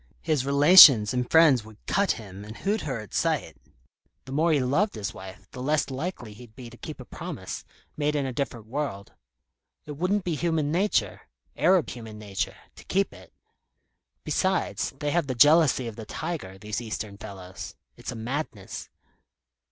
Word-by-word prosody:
His 150 Hz, -5 st, 0 dB
relations 140 Hz, -, +9 dB
and 125 Hz, -1 st, -1 dB
friends 155 Hz, -8 st, +5 dB
would 110 Hz, -1 st, -14 dB
cut 200 Hz, 0 st, +2 dB
him, 100 Hz, -2 st, -10 dB
and 110 Hz, +2 st, -10 dB
hoot 210 Hz, +2 st, -1 dB
her 135 Hz, -6 st, -3 dB
at 105 Hz, -, -13 dB
sight. -, -, 0 dB, 0.7 s
The 130 Hz, -, -10 dB
more 160 Hz, +4 st, +2 dB
he 150 Hz, -, +3 dB
loved 145 Hz, +12 st, +1 dB
his 100 Hz, -2 st, -4 dB
wife, 95 Hz, +1 st, -11 dB
the 125 Hz, -, -8 dB
less 150 Hz, +1 st, 0 dB
likely 130 Hz, -, -5 dB
he'd 110 Hz, 0 st, -15 dB
be 125 Hz, -3 st, -10 dB
to 120 Hz, -, -13 dB
keep -, -, -8 dB
a -, -, -9 dB
promise, -, -, -7 dB, 0.3 s
made 150 Hz, 0 st, 0 dB
in 140 Hz, -2 st, 0 dB
a 130 Hz, -, -3 dB
different 120 Hz, -4 st, -4 dB
world. 115 Hz, -5 st, -4 dB, 0.7 s
It 150 Hz, -1 st, -8 dB
wouldn't 185 Hz, +4 st, 0 dB
be 175 Hz, -, -2 dB
human 155 Hz, -2 st, 0 dB
nature 170 Hz, -, 0 dB, 0.3 s
Arab 180 Hz, -2 st, +3 dB
human 110 Hz, -3 st, -9 dB
nature 100 Hz, -2 st, -4 dB, 0.2 s
to -, -, -12 dB
keep 195 Hz, +1 st, 0 dB
it. -, -, -15 dB, 0.9 s
Besides, 190 Hz, -1 st, 0 dB
they 145 Hz, +1 st, -2 dB
have 170 Hz, -3 st, +1 dB
the 130 Hz, -, -2 dB
jealousy 145 Hz, 0 st, +5 dB
of 115 Hz, -, -8 dB
the 110 Hz, -, -7 dB
tiger, 95 Hz, -, -5 dB
these 105 Hz, +3 st, -4 dB
Eastern 110 Hz, -3 st, -6 dB
fellows. 95 Hz, -2 st, -9 dB, 0.2 s
It's -, -, -7 dB
a -, -, -7 dB
madness." 115 Hz, -3 st, -5 dB
130 Hz, 175 wpm, -26 LUFS, 110-160 Hz, 0.9 s, relations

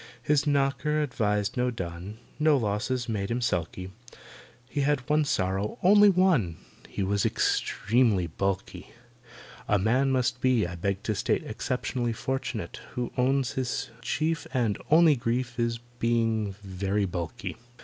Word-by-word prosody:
His 150 Hz, +2 st, +2 dB
knocker 145 Hz, +2 st, +1 dB
advertised 105 Hz, -6 st, -1 dB
no 125 Hz, 0 st, +2 dB
dun, 95 Hz, -1 st, -6 dB, 0.2 s
No 150 Hz, -1 st, +4 dB
losses 120 Hz, +3 st, -1 dB
made 100 Hz, -4 st, -2 dB
him 120 Hz, +1 st, 0 dB
sulky, 90 Hz, -4 st, -2 dB, 0.8 s
He 145 Hz, +3 st, -2 dB
had 140 Hz, -3 st, 0 dB
one 150 Hz, 0 st, +3 dB
sorrow—only 140 Hz, -, +3 dB
one— 170 Hz, -, +2 dB, 0.3 s
He 100 Hz, -, -3 dB
was 100 Hz, +1 st, +1 dB
extremely 110 Hz, -4 st, +2 dB
bulky. 95 Hz, +4 st, -3 dB, 0.7 s
A 105 Hz, -, +3 dB
man 125 Hz, +7 st, +2 dB
must 125 Hz, -1 st, 0 dB
be, 125 Hz, -5 st, +3 dB
I 85 Hz, -, -5 dB
beg 95 Hz, +3 st, -2 dB
to 110 Hz, -, 0 dB
state, 100 Hz, -, 0 dB
Exceptionally 120 Hz, -2 st, -2 dB
fortunate 120 Hz, -5 st, -4 dB, 0.2 s
Who 125 Hz, -1 st, -3 dB
owns 135 Hz, 0 st, +1 dB
his 130 Hz, +1 st, -3 dB
chief 155 Hz, +7 st, -1 dB
And 115 Hz, -5 st, +1 dB
only 160 Hz, -1 st, +6 dB
grief 120 Hz, 0 st, -2 dB
Is—being 115 Hz, -3 st, -1 dB
very 100 Hz, +1 st, -1 dB
bulky. 85 Hz, +3 st, -5 dB
120 Hz, 130 wpm, -27 LUFS, 100-135 Hz, 0.8 s, only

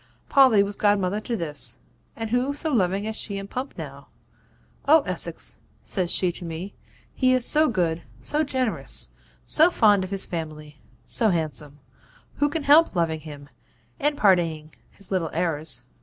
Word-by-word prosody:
'Polly 255 Hz, -7 st, +5 dB
was 200 Hz, 0 st, -4 dB
godmother 205 Hz, -1 st, +1 dB
to 235 Hz, +1 st, -3 dB
this, 145 Hz, -, -1 dB, 0.4 s
and 225 Hz, -1 st, -5 dB
who 250 Hz, +3 st, 0 dB
so 310 Hz, +2 st, -3 dB
loving 195 Hz, -2 st, 0 dB
as 220 Hz, 0 st, -4 dB
she 200 Hz, -2 st, -3 dB
and 195 Hz, 0 st, -8 dB
Pump 260 Hz, +2 st, -5 dB
now? -, -, -9 dB, 0.8 s
"Oh, 315 Hz, +2 st, +6 dB
Essex," -, -, -1 dB, 0.2 s
says 185 Hz, -3 st, -2 dB
she 180 Hz, 0 st, +2 dB
to 175 Hz, -, -8 dB
me, 170 Hz, +4 st, -6 dB, 0.4 s
"he 255 Hz, -1 st, +2 dB
is 255 Hz, -2 st, +2 dB
so 310 Hz, 0 st, +7 dB
good, 170 Hz, -6 st, -1 dB, 0.2 s
so 300 Hz, +1 st, -1 dB
generous, 260 Hz, -5 st, -1 dB, 0.3 s
so 320 Hz, +3 st, +5 dB
fond 205 Hz, -, +3 dB
of 185 Hz, -, -6 dB
his 195 Hz, 0 st, -1 dB
family; 155 Hz, -3 st, -7 dB, 0.2 s
so 225 Hz, -, +1 dB
handsome; 155 Hz, -4 st, -3 dB, 0.6 s
who 290 Hz, +1 st, +2 dB
can 310 Hz, +1 st, -3 dB
help 295 Hz, -3 st, +5 dB
loving 165 Hz, -2 st, 0 dB
him, 145 Hz, -2 st, -11 dB, 0.5 s
and 295 Hz, 0 st, 0 dB
pardoning 165 Hz, -, +1 dB, 0.2 s
his 200 Hz, -, -12 dB
little 180 Hz, -4 st, -1 dB
errors?" 160 Hz, -2 st, -2 dB
195 Hz, 160 wpm, -24 LUFS, 165-255 Hz, 0.8 s, so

